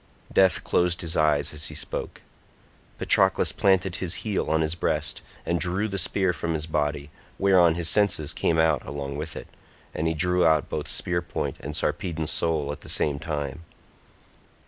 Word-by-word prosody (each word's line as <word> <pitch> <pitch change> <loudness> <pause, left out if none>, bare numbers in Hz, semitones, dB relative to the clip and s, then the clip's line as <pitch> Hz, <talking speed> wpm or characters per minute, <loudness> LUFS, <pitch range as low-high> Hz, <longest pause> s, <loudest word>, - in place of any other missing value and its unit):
Death 95 -1 +4
closed 90 -1 +1
his 80 -2 -2
eyes 75 -2 +2
as 75 0 -2
he - - -7
spoke. - - -5 0.7
Patroclus - - +3
planted 95 -2 +2
his 90 -2 -1
heel 105 -3 -1
on 80 0 +2
his 80 0 0
breast 85 - -2 0.2
and 85 0 0
drew 95 +5 0
the 100 -2 -1
spear 95 +1 +2
from 85 -1 -3
his 75 0 -2
body, 75 -2 -2 0.3
whereon 90 -4 +4
his 85 -1 -1
senses 90 -8 +2
came 80 - 0
out 80 0 +2
along 70 0 -5
with 75 +2 -5
it, - - -8 0.5
and 80 - -1
he 80 - 0
drew 90 +2 +2
out 80 -3 +3
both - - -4
spear 85 -1 0
point 85 - -4
and 75 +2 -6
Sarpedon's 80 0 -1
soul 80 -4 0
at 75 - -8
the - - -10
same 70 -2 0
time. 75 -1 -4
80 Hz, 175 wpm, -25 LUFS, 75-90 Hz, 0.7 s, Death